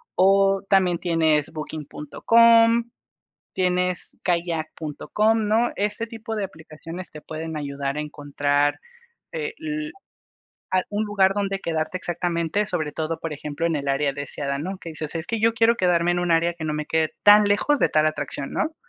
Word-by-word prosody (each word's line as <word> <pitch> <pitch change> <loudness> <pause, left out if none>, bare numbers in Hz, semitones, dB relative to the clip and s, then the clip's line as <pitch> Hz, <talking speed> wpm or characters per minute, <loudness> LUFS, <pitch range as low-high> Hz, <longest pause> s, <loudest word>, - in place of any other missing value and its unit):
o 195 +1 +4
también 185 -3 +3
tienes 160 -4 +1
Booking.com, 230 +10 +3 0.6
tienes 180 -1 0
kayak.com, 175 +5 -1
¿no?, 230 +3 +2
ese 210 +3 -1
tipo 225 -1 -6
de 205 - -1
aplicaciones 165 0 -9
te 150 - -10
pueden 160 0 -6
ayudar 140 -1 -3
a - - -1
encontrar 145 -1 0 0.5
el, 320 -11 -4 0.8
a 185 -1 +2
un 210 +1 -1
lugar 195 -2 +2
donde 195 -1 -2
quedarte 160 +2 -2
exactamente, 175 +3 -1
sobre 160 -7 -2
todo, 160 0 -3
por 160 -1 -5
ejemplo, 150 +2 -3
en 165 -2 0
el 140 -1 -4
área 140 0 +1
deseada, 140 0 -3
¿no?, 185 +6 -4
que 170 - -8
dices: 155 0 -5
"Es 165 0 -4
que 230 -1 -2
yo 230 +1 +3
quiero 230 +1 +4
quedarme 175 -3 +2
en 175 - 0
un 175 - -1
área 170 +1 +2
que 165 -2 -7
no 155 - -1
me 150 0 -3
quede 160 -1 +1
tan 205 0 +8
lejos 205 +9 +2
de - - +4
tal 155 0 +3
atracción", 145 -2 -3
¿no?, 315 0 -1
175 Hz, 165 wpm, -23 LUFS, 155-205 Hz, 0.8 s, tan